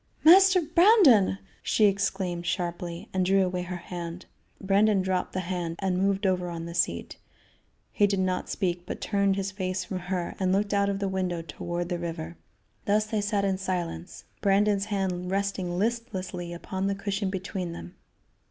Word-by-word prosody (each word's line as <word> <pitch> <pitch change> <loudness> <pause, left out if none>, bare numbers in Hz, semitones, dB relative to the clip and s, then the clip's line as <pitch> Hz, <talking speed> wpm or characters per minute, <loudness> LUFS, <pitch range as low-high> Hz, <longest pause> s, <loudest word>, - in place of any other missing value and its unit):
"Master 370 +3 +7
Brandon!" 315 - +5 0.2
she 215 - +3
exclaimed 190 -3 0
sharply, 175 -1 -3
and 190 -1 +1
drew 190 +1 +3
away 180 0 -2
her 180 0 -5
hand. 175 0 -7 0.3
Brandon 200 0 +3
dropped 185 -1 -1
the 185 - -1
hand 175 -2 -3
and 185 -1 -1
moved 195 +1 +1
over 180 -2 +1
on 165 -1 -5
the 170 - -7
seat. 85 - -1 0.7
He 205 - +3
did 200 -1 0
not 185 -1 -1
speak, 175 -2 -2
but - - -5
turned 200 -2 +1
his 195 0 -2
face 185 -1 -2
from 185 0 -4
her 180 -1 -3
and 185 -1 +1
looked 200 +2 +1
out 200 0 +2
of 200 - -1
the 200 0 -2
window 185 -3 -2
toward 175 +2 -4
the 175 -2 -2
river. 170 -1 -5 0.5
Thus 210 +1 +2
they 215 -1 -1
sat 205 -1 0
in 190 -1 0
silence, 175 - -4 0.2
Brandon's 200 0 +3
hand 190 -3 -2
resting 195 -2 -1
listlessly 190 -5 -3
upon 190 +3 -3
the 200 - 0
cushion 200 0 -2
between 190 -2 -4
them. 175 +1 -9
190 Hz, 170 wpm, -27 LUFS, 180-200 Hz, 0.7 s, Master